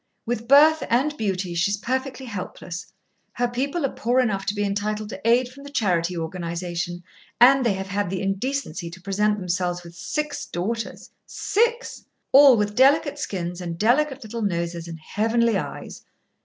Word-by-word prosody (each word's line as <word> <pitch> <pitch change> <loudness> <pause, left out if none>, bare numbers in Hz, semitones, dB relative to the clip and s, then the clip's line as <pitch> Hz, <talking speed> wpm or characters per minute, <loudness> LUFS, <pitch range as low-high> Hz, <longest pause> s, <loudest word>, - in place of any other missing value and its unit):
With 235 -1 -3
birth 305 +4 +6
and 275 +6 +2
beauty, 190 -6 -2
she 170 +3 +1
is 205 - 0
perfectly 260 +3 -3
helpless. 185 -5 -6 0.5
Her 245 0 0
people 275 +6 -1
are 270 - -1
poor 245 +2 +1
enough 200 -6 0
to 205 - 0
be 205 - 0
entitled 210 +1 -2
to - - -7
aid 240 +2 +3
from 265 +3 -13
the 285 - -9
Charity 180 -9 0
Organisation, 175 +1 -4 0.4
and 265 +2 +7
they 230 -4 +2
have 190 0 -5
had 200 -1 -1
the 190 0 -2
indecency 195 - -2
to 175 +2 -11
present 205 +2 0
themselves 180 -1 -2
with 170 0 -12
six 295 - -4
daughters 225 +7 -4 0.2
six! 470 +3 -1 0.3
All 275 -2 +8
with 210 0 0
delicate 285 +4 +4
skins 180 -7 -4
and 170 -1 -5
delicate 265 - +2
little 230 +1 -6
noses 170 -3 -2
and 165 -1 -7
heavenly 225 +6 +1
eyes. 190 - -5
210 Hz, 170 wpm, -24 LUFS, 180-255 Hz, 0.5 s, All